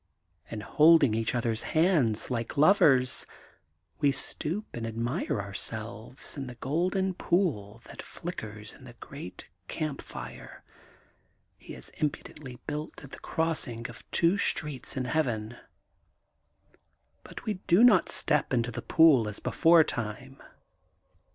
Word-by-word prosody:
And, 105 Hz, -2 st, -6 dB
holding 155 Hz, -5 st, +5 dB
each 110 Hz, +1 st, 0 dB
other's 115 Hz, -2 st, -1 dB
hands 155 Hz, -, +1 dB
like 115 Hz, +3 st, -3 dB
lovers, 140 Hz, -6 st, +4 dB, 0.7 s
we 145 Hz, -, +3 dB
stoop 170 Hz, +8 st, -1 dB
and 115 Hz, -1 st, -4 dB
admire 115 Hz, 0 st, -2 dB
our 100 Hz, 0 st, -6 dB
selves 110 Hz, +5 st, -5 dB
in 135 Hz, -3 st, -5 dB
the 125 Hz, -, -8 dB
golden 180 Hz, +9 st, -1 dB
pool 130 Hz, -, -1 dB
that -, -, -10 dB
flickers 110 Hz, -, -8 dB
in 130 Hz, -, -16 dB
the 120 Hz, -2 st, -12 dB
great 140 Hz, -10 st, -10 dB, 0.2 s
campfire 155 Hz, -3 st, -7 dB, 0.9 s
he -, -, -12 dB
has -, -, -7 dB
impudently 150 Hz, -4 st, -5 dB
built 150 Hz, +1 st, -6 dB
at 135 Hz, -, -12 dB
the -, -, -9 dB
crossing 140 Hz, -8 st, -1 dB
of 115 Hz, -1 st, -13 dB
two 175 Hz, +4 st, +2 dB
streets 145 Hz, -9 st, -1 dB
in 130 Hz, -, -1 dB
Heaven. 120 Hz, -6 st, -1 dB, 1.7 s
But -, -, -11 dB
we 210 Hz, -4 st, -3 dB
do 185 Hz, +6 st, +5 dB
not 215 Hz, -7 st, +5 dB
step 150 Hz, -3 st, +1 dB
into 120 Hz, 0 st, 0 dB
the 120 Hz, +1 st, -5 dB
pool 155 Hz, -9 st, +5 dB
as 105 Hz, -, -4 dB
before 165 Hz, -1 st, +4 dB
time. 125 Hz, +3 st, -5 dB
135 Hz, 130 wpm, -28 LUFS, 115-160 Hz, 1.7 s, holding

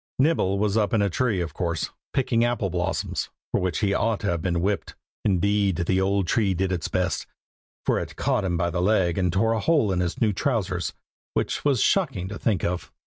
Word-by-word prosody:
Nibble 130 Hz, -, +2 dB
was 105 Hz, +1 st, +1 dB
up 105 Hz, 0 st, +2 dB
in 105 Hz, -, +3 dB
a 100 Hz, -, +1 dB
tree, 110 Hz, -4 st, +1 dB
of 85 Hz, -, -4 dB
course, 85 Hz, -4 st, -2 dB, 0.2 s
picking 120 Hz, -4 st, +1 dB
apple 120 Hz, -6 st, 0 dB
blossoms, 90 Hz, 0 st, -2 dB, 0.2 s
for -, -, +1 dB
which 90 Hz, +3 st, -1 dB
he 100 Hz, -2 st, +2 dB
ought 110 Hz, 0 st, +1 dB
to 100 Hz, -5 st, 0 dB
have 85 Hz, -2 st, -1 dB
been 85 Hz, -1 st, 0 dB
whipped. 100 Hz, +2 st, -1 dB, 0.3 s
Indeed, 100 Hz, 0 st, +2 dB
the 95 Hz, +2 st, +2 dB
old 100 Hz, 0 st, +1 dB
tree 100 Hz, -1 st, +1 dB
did 95 Hz, +2 st, 0 dB
its 90 Hz, -4 st, -1 dB
best, -, -, -1 dB, 0.6 s
for -, -, +2 dB
it -, -, -6 dB
caught 130 Hz, -6 st, 0 dB
him 90 Hz, -3 st, 0 dB
by 85 Hz, +1 st, 0 dB
the 90 Hz, -, -1 dB
leg, 95 Hz, -3 st, +2 dB
and 90 Hz, -2 st, +1 dB
tore 100 Hz, +5 st, +2 dB
a 115 Hz, -, 0 dB
hole 145 Hz, -5 st, +2 dB
in 90 Hz, -, 0 dB
his 90 Hz, -1 st, -1 dB
new 110 Hz, -3 st, +2 dB
trousers, 95 Hz, -, -1 dB, 0.4 s
which -, -, -1 dB
was 140 Hz, -5 st, +2 dB
shocking 135 Hz, -, +1 dB
to 100 Hz, -, -6 dB
think 105 Hz, -6 st, 0 dB
of. 90 Hz, 0 st, -2 dB
100 Hz, 215 wpm, -25 LUFS, 90-110 Hz, 0.6 s, in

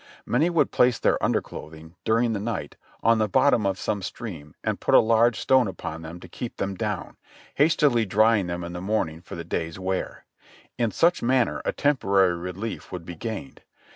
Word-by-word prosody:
Many 150 Hz, +8 st, +2 dB
would 170 Hz, -2 st, +2 dB
place 125 Hz, -1 st, +3 dB
their -, -, +1 dB
underclothing, 80 Hz, +1 st, -3 dB
during 115 Hz, +1 st, +2 dB
the 105 Hz, -, -2 dB
night, 110 Hz, +2 st, -4 dB, 0.3 s
on 115 Hz, 0 st, +4 dB
the 110 Hz, -1 st, +1 dB
bottom 120 Hz, -1 st, +3 dB
of 95 Hz, -1 st, -1 dB
some 100 Hz, +1 st, -2 dB
stream 90 Hz, -, -7 dB
and -, -, -1 dB
put -, -, +2 dB
a -, -, +10 dB
large 115 Hz, +1 st, +3 dB
stone 130 Hz, -3 st, +4 dB
upon 80 Hz, -4 st, -6 dB
them 80 Hz, +2 st, -8 dB
to -, -, -10 dB
keep 120 Hz, +7 st, -7 dB
them 100 Hz, 0 st, -2 dB
down, 95 Hz, -, -4 dB, 0.4 s
hastily 140 Hz, -6 st, +3 dB
drying 105 Hz, 0 st, +3 dB
them 85 Hz, 0 st, -4 dB
in 85 Hz, 0 st, -6 dB
the 90 Hz, -, -5 dB
morning 90 Hz, -5 st, -1 dB
for -, -, -9 dB
the 85 Hz, -, -5 dB
day's 80 Hz, 0 st, -3 dB
wear. 95 Hz, 0 st, -3 dB, 0.5 s
In 115 Hz, -2 st, +2 dB
such 170 Hz, +9 st, +2 dB
manner 125 Hz, 0 st, +1 dB
a -, -, +1 dB
temporary 100 Hz, -10 st, +2 dB
relief 90 Hz, +6 st, -6 dB
would 90 Hz, -2 st, -6 dB
be 90 Hz, -, -7 dB
gained. 105 Hz, -, -6 dB
105 Hz, 190 wpm, -25 LUFS, 90-120 Hz, 0.5 s, a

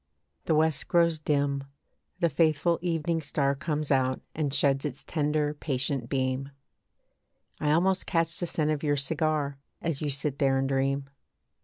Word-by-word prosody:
The 160 Hz, -, +2 dB
West 155 Hz, -2 st, +2 dB
grows 170 Hz, -2 st, +3 dB
dim. 140 Hz, -2 st, 0 dB, 0.6 s
The 170 Hz, -, +4 dB
faithful 160 Hz, +2 st, +2 dB
evening 165 Hz, -1 st, 0 dB
star 140 Hz, -1 st, +1 dB
Comes 150 Hz, +1 st, -2 dB
out 130 Hz, -1 st, +2 dB
and 150 Hz, -3 st, -1 dB
sheds 135 Hz, -1 st, +2 dB
its 145 Hz, -4 st, -4 dB
tender 150 Hz, -1 st, 0 dB
patient 135 Hz, -3 st, -2 dB
beam. 130 Hz, 0 st, -1 dB, 1.1 s
I 150 Hz, -, 0 dB
almost 185 Hz, +4 st, +2 dB
catch 165 Hz, -1 st, 0 dB
the 175 Hz, -, -1 dB
scent 155 Hz, -2 st, 0 dB
of 150 Hz, -2 st, -1 dB
your 145 Hz, -2 st, +1 dB
cigar, 145 Hz, -1 st, -1 dB, 0.2 s
As 165 Hz, -4 st, -1 dB
you 150 Hz, -, -1 dB
sit 140 Hz, 0 st, -2 dB
there 135 Hz, -1 st, +3 dB
and 135 Hz, 0 st, +1 dB
dream. 135 Hz, +1 st, 0 dB
150 Hz, 155 wpm, -28 LUFS, 140-160 Hz, 1.1 s, The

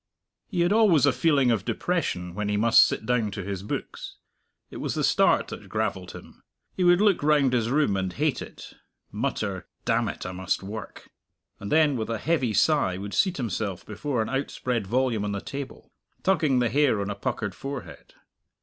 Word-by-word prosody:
He 180 Hz, -5 st, -1 dB
had 175 Hz, +3 st, +3 dB
always 200 Hz, -, +5 dB
a 140 Hz, -, +3 dB
feeling 140 Hz, -6 st, +3 dB
of 110 Hz, -4 st, 0 dB
depression 90 Hz, -, -2 dB
when 105 Hz, +2 st, -3 dB
he 105 Hz, -, 0 dB
must 115 Hz, +2 st, +6 dB
sit -, -, -4 dB
down 120 Hz, -2 st, +1 dB
to 100 Hz, -1 st, -6 dB
his 100 Hz, -1 st, -4 dB
books. 100 Hz, -, -6 dB, 0.6 s
It -, -, -8 dB
was -, -, -3 dB
the -, -, -1 dB
start -, -, +3 dB
that -, -, -9 dB
gravelled -, -, -2 dB
him. -, -, -13 dB, 0.3 s
He 185 Hz, -, 0 dB
would 175 Hz, 0 st, +5 dB
look 205 Hz, -3 st, +3 dB
round 145 Hz, -3 st, +3 dB
his 115 Hz, -2 st, +1 dB
room 145 Hz, -6 st, +2 dB
and 95 Hz, -1 st, -2 dB
hate -, -, -1 dB
it, -, -, -10 dB, 0.4 s
mutter -, -, -3 dB, 0.2 s
"Damn -, -, +1 dB
it, -, -, -7 dB
I 90 Hz, -, -4 dB
must 95 Hz, +1 st, -2 dB
work;" 105 Hz, +3 st, -8 dB, 0.5 s
and 100 Hz, -, -7 dB
then, 150 Hz, -3 st, +4 dB
with 110 Hz, -1 st, -3 dB
a 115 Hz, -, -1 dB
heavy 135 Hz, -2 st, 0 dB
sigh, 105 Hz, -, +2 dB
would 100 Hz, +1 st, -6 dB
seat 185 Hz, -2 st, +2 dB
himself 105 Hz, -6 st, -3 dB
before 115 Hz, +3 st, -2 dB
an -, -, -6 dB
outspread 125 Hz, -5 st, -2 dB
volume 120 Hz, -1 st, 0 dB
on 105 Hz, 0 st, -2 dB
the 100 Hz, -, -2 dB
table, 140 Hz, -1 st, -8 dB, 0.3 s
tugging 155 Hz, -8 st, +2 dB
the 120 Hz, -2 st, +2 dB
hair 135 Hz, -3 st, +2 dB
on 100 Hz, 0 st, -2 dB
a -, -, -4 dB
puckered 100 Hz, 0 st, -3 dB
forehead. 135 Hz, +3 st, -8 dB
120 Hz, 195 wpm, -26 LUFS, 100-150 Hz, 0.6 s, must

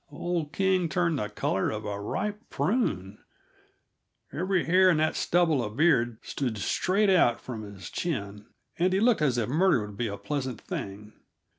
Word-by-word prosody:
old 160 Hz, +1 st, -3 dB
King 185 Hz, -1 st, +1 dB
turned 170 Hz, -3 st, +1 dB
the 105 Hz, -, -3 dB
color 95 Hz, -, -1 dB
of 110 Hz, 0 st, -5 dB
a 100 Hz, -1 st, -4 dB
ripe 210 Hz, -, -4 dB
prune; 100 Hz, -, -1 dB, 1.1 s
every 185 Hz, +3 st, 0 dB
hair 185 Hz, +2 st, +5 dB
in 170 Hz, -, +3 dB
that 155 Hz, 0 st, +1 dB
stubble 165 Hz, -7 st, +2 dB
of 105 Hz, +1 st, -6 dB
beard 125 Hz, -8 st, +3 dB
stood 125 Hz, -6 st, -3 dB
straight 195 Hz, -, +1 dB
out 120 Hz, -11 st, +4 dB
from 115 Hz, -4 st, -7 dB
his 100 Hz, -4 st, -9 dB
chin, 105 Hz, -, -4 dB, 0.3 s
and 180 Hz, +2 st, +2 dB
he 190 Hz, -, +2 dB
looked 225 Hz, -4 st, +3 dB
as 135 Hz, -5 st, +2 dB
if 115 Hz, -3 st, 0 dB
murder 155 Hz, -, +2 dB
would 105 Hz, -1 st, -11 dB
be 120 Hz, -, -1 dB
a 100 Hz, -1 st, -5 dB
pleasant 130 Hz, -5 st, -3 dB
thing. 105 Hz, +2 st, -7 dB
145 Hz, 170 wpm, -27 LUFS, 105-180 Hz, 1.1 s, hair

